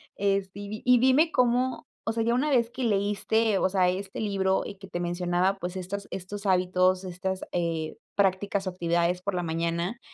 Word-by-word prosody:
Este, 195 -1 0
y 200 - -7
di 215 +1 -6
y 250 -1 +6
dime 265 +6 +4
cómo, 250 +1 +1 0.2
o - - +1
sea, 225 0 0
ya 235 - +2
una 285 +5 +1
vez 235 -3 +3
que 255 +1 -4
leíste, 210 +1 +1
o 190 - +2
sea, 185 -1 +2
este 195 +3 -4
libro 195 -2 +1
y 200 - -7
que 195 0 -12
te 175 - -4
mencionaba, 175 +2 0
pues, 180 -1 -5
estas 190 +2 -5
estos 200 +2 -6
hábitos, 185 0 +2
estas, 185 +1 -4
eh, 165 -2 -2 0.2
prácticas 200 0 +1
o - - 0
actividades 175 0 0
por 200 0 -2
la 175 -1 -1
mañana, 170 +6 -2
190 Hz, 195 wpm, -27 LUFS, 180-210 Hz, 0.2 s, y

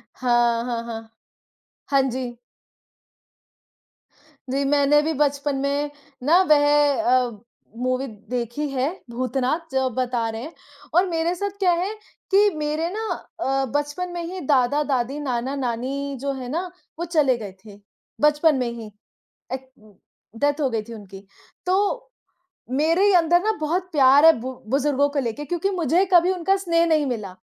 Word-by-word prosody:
हाँ, 240 -2 +2
हाँ, 235 -2 -3
हाँ। 225 -1 -8 0.8
हाँ 275 -1 +4
जी। 245 -1 -5 2.1
जी 275 +2 0
मैंने 290 +1 +4
भी 320 +2 -1
बचपन 285 -1 0
में 285 +1 -1 0.3
ना 335 +7 +5
वह 290 -1 +5 0.3
अ, 245 -6 +1 0.4
मूवी 255 +2 -1 0.2
देखी 245 +4 -2
है 265 -1 0 0.2
भूतनाथ 255 +4 -1
जो 265 0 +1
आप 260 - -1
बता 245 -2 0
रहे 225 0 -5
हैं, 310 +6 -8 0.4
और 355 +3 +5
मेरे 335 +1 0
साथ 405 +3 -2
क्या 370 -3 +3
है 360 +4 -1 0.4
कि 410 +2 +5
मेरे 305 +2 -1
ना 440 +1 -3 0.3
अ, 270 -4 0
बचपन 290 +5 -2
में 345 -1 -4
ही 365 +3 -5
दादा-दादी, 275 0 +1
नाना-नानी 265 +1 -2
जो 280 0 -1
हैं 245 - -6
ना, 335 +7 -2 0.3
वो 340 - -2
चले 300 -7 +2
गए 210 -4 -7
थे 205 -1 -13 0.4
बचपन 300 +1 +4
में 250 -2 -1
ही। 225 -2 -8 0.6
ए - - 0 0.8
डेथ 290 +3 +1
हो 275 - +2
गई 225 -3 -1
थी 230 +2 -10
उनकी। 200 -2 -11 0.4
तो 405 +7 0 0.6
मेरे 330 +9 +3
अंदर 345 0 +4
ना 435 - +2
बहुत 350 +4 -1
प्यार 280 0 +6
है 325 - +10
बु 255 +3 -5 0.2
बुज़ुर्गों 285 +1 +2
को 285 0 -1
लेके 255 +3 -3
क्योंकि 350 +4 -1
मुझे 350 0 +2
कभी 350 +1 +6
उनका 375 +1 +1
स्नेह 335 -3 +2
नहीं 315 -3 +2
मिला 210 -8 -4
280 Hz, 155 wpm, -23 LUFS, 250-330 Hz, 2.1 s, है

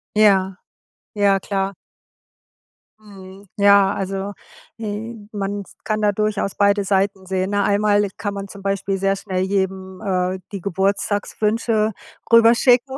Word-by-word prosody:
Ja, 195 -3 +4 0.6
ja 200 -2 +3
klar. 195 0 -2 1.3
Mhm. 195 -1 -14
Ja, 200 -1 +5
also, 195 +1 -4 0.5
äh, 220 +1 -5 0.2
man 200 -1 -3 0.2
kann 215 -1 -1
da 210 -1 +3
durchaus 210 -1 -1
beide 200 0 +3
Seiten 195 0 0
sehen, 190 +1 -1
ne? 205 0 +1
Einmalig 205 0 +1
kann 205 -1 -3
man 200 0 -6
zum 200 0 -12
Beispiel 195 0 -1
sehr 195 +1 +1
schnell 185 -2 -3
jedem, 190 -1 -2
äh, 185 -1 -1
die 200 -3 -5
Geburtstagswünsche 210 +3 0 0.4
rüberschicken, 240 +3 +5
200 Hz, 125 wpm, -21 LUFS, 195-210 Hz, 1.3 s, Ja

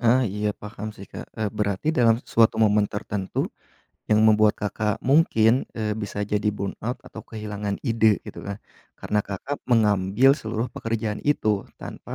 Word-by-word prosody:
Ah 120 +2 +4
iya, 105 +2 -2
paham 105 +1 -7
sih 100 - -10
Kak, - - -8
eee, 110 -1 0
berarti 105 +4 -1
dalam 120 -8 +4
suatu 115 -1 +3
momen 105 -1 +4
tertentu 100 -1 -3 0.6
yang 105 0 +5
membuat 110 -1 +5
Kakak 105 0 -2
mungkin, 130 -5 +4
eee, 110 -1 -2
bisa 105 -1 -4
jadi 105 +1 0
burnout 110 +5 -4
atau 110 - -10
kehilangan 105 -2 -5
ide 110 -4 +3
gitu - - -8
kan, 100 0 -4 0.4
karena 105 - 0
Kakak 100 +9 -5
mengambil 105 +1 +4
seluruh 110 +2 -3
pekerjaan 110 -2 -3
itu 110 -9 +1 0.2
tanpa - - -8
105 Hz, 155 wpm, -24 LUFS, 105-115 Hz, 0.6 s, yang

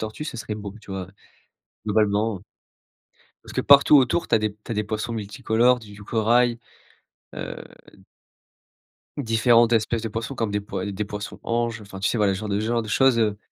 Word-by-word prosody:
tortue, 110 +7 -5
ce 135 - -6
serait 110 -1 -5
beau, 100 -1 -7
tu 105 - -15
vois? 95 -2 -5 0.8
Globalement, 105 0 +1
heu 95 - -20 1.0
parce - - -11
que - - 0
partout 140 +1 +7
autour 135 +6 +2
tu - - +3
as - - +3
des 105 -1 -1
tu 105 +3 -11
as - - 0
des 105 0 -1
poissons 110 +2 -3
multicolores 110 +4 +1
du 105 -3 -13
du 105 0 -12
corail, 120 +2 +2 0.8
heu - - -5 1.6
différentes 115 -1 +3
espèces 115 0 +1
de 115 - -3
poissons 115 +5 -5
comme 115 -3 -2
des 105 0 -1
poi 95 -1 -5
heu, 100 - -3
des 105 - -2
poissons‑anges 110 +3 -3
enfin 100 -1 -10
tu 95 - +1
sais 120 - 0
voilà 100 -2 +2
ce 95 - -4
genre 110 - -5
de 100 +1 0
genre 115 +1 0
de 110 - -8
choses, 130 +2 +3
heu, 105 -2 +1
110 Hz, 200 wpm, -24 LUFS, 105-115 Hz, 1.6 s, partout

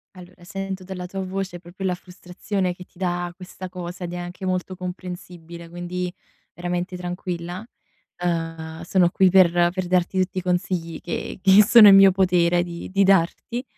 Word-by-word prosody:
Allora, 180 0 -14
sento 195 +1 -5
dalla 180 -1 -6
tua 195 +2 -6
voce 185 -1 -4
proprio 180 +2 -8
la 180 - +1
frustrazione 180 +1 -4
che 180 0 -12
ti - - -27
dà 175 -1 -2
questa 185 0 -9
cosa, 180 0 -7
ed 175 - -6
è - - -4
anche 175 +2 -7
molto 185 0 -2
comprensibile, 175 -2 -8
quindi 175 +1 -4 0.4
veramente 175 +1 -3
tranquilla. 180 +1 -5 0.6
Uhm, 165 -1 -3
sono 175 0 +3
qui 190 -1 +4
per 185 -2 +6 0.2
per 185 0 -3
darti 180 +1 +1
tutti 185 0 0
i - - -2
consigli 175 -2 -2
che 175 - -5
che 195 +2 +7
sono 220 +1 +8
in 195 - +9
mio 195 0 +8
potere 175 -2 +2
di 170 0 -8
di 195 +1 +3
darti. 195 +6 +1
180 Hz, 170 wpm, -23 LUFS, 175-190 Hz, 0.6 s, in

